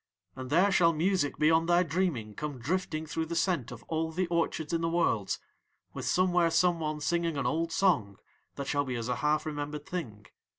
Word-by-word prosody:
And 130 -1 -7
there 180 +7 +4
shall 170 -3 +4
music 165 -2 0
beyond 160 +2 +3
thy 175 +1 +5
dreaming 155 - -1
come 150 +3 -5
drifting 160 +4 -2
through 160 +1 -3
the 170 - -4
scent 165 - 0
of 120 -1 -9
all 160 0 -2
the 180 +3 0
orchards 165 -2 -1
in 165 - +1
the 165 - 0
Worlds, 165 - +1 0.6
with - - -5
somewhere 180 -2 +3
someone 160 -3 +1
singing 170 0 0
an 140 - -1
old 165 +6 0
song 145 - +1 0.4
that 140 - -4
shall 145 +1 0
be 130 -3 -4
as 115 0 -3
a 125 - 0
half 150 +4 +1
remembered 150 -1 -4
thing. 115 -13 -6
160 Hz, 195 wpm, -30 LUFS, 140-170 Hz, 0.6 s, thy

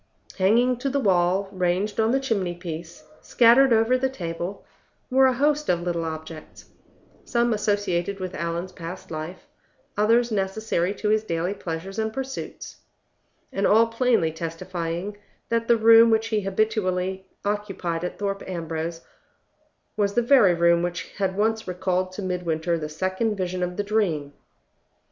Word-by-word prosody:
Hanging 235 +6 +3
to 275 +3 -2
the 280 +1 0
wall, 190 -3 +2
ranged 185 +3 -1
on 220 0 +3
the 265 +3 +2
chimney 200 -10 -1
piece, 170 -2 -8 0.2
scattered 245 +3 +5
over 225 +2 +4
the 265 +1 +1
table, 175 -4 -5 0.5
were 265 +1 +6
a 260 - +2
host 295 +3 +1
of 175 -1 +2
little 170 -2 -2
objects, 160 0 -8 0.6
some 235 -1 +1
associated 200 -3 -1
with 185 -1 -5
Allan's 170 +2 -3
past 170 +2 -8
life, 160 +3 -6 0.5
others 230 +3 +3
necessary 195 -2 -1
to 210 +2 -2
his 215 0 +2
daily 170 -1 -2
pleasures 190 +1 -5
and 220 0 -1
pursuits, 265 +3 -6 0.8
and 195 - +1
all 225 +2 +6
plainly 230 -7 +1
testifying 170 +3 -4 0.3
that 230 0 0
the 235 - +5
room 230 +1 +7
which 225 0 +2
he 215 -2 +1
habitually 190 -2 -1 0.2
occupied 195 -5 -2
at 180 - -4
Thorpe 200 -1 -2
Ambrose 165 -2 -4 0.9
was 205 -2 0
the 240 - +3
very 230 -8 +5
room 170 0 +4
which 175 0 -3
had 190 -1 0
once 220 +1 0
recalled 185 0 -1
to 200 - -6
Midwinter 170 -2 -1
the 155 -2 -4
second 190 +7 -1
vision 185 -1 -3
of 180 0 -2
the 205 - 0
dream. 180 -9 -1
190 Hz, 150 wpm, -24 LUFS, 175-220 Hz, 0.9 s, room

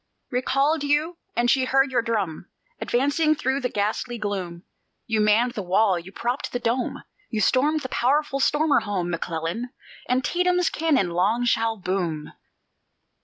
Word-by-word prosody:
Recalled 275 +4 +1
you; 300 +4 0 0.2
and 240 +1 +2
she 260 -1 +2
heard 270 +1 +2
your 250 - +2
drum 205 -7 -3 0.3
Advancing 285 +5 +1
through 265 -1 -1
the 250 - -1
ghastly 215 +4 -2
gloom. 190 -5 -4 0.4
You 220 -1 0
manned 215 +4 +3
the 225 - -4
wall, 190 0 +2
you 175 +3 -11
propped 245 +6 -3
the 245 - -1
Dome, 245 +1 -2 0.3
You 220 - -2
stormed 290 +8 +2
the 260 - -5
powerful 275 +3 +1
stormer 295 +2 +3
home, 185 -4 -2
McClellan! 170 +7 -3 0.4
Antietam's 355 +8 +1
cannon 285 - +1
long 205 +8 +1
shall 225 -1 +1
boom. 180 -5 -3
240 Hz, 145 wpm, -24 LUFS, 200-275 Hz, 0.4 s, manned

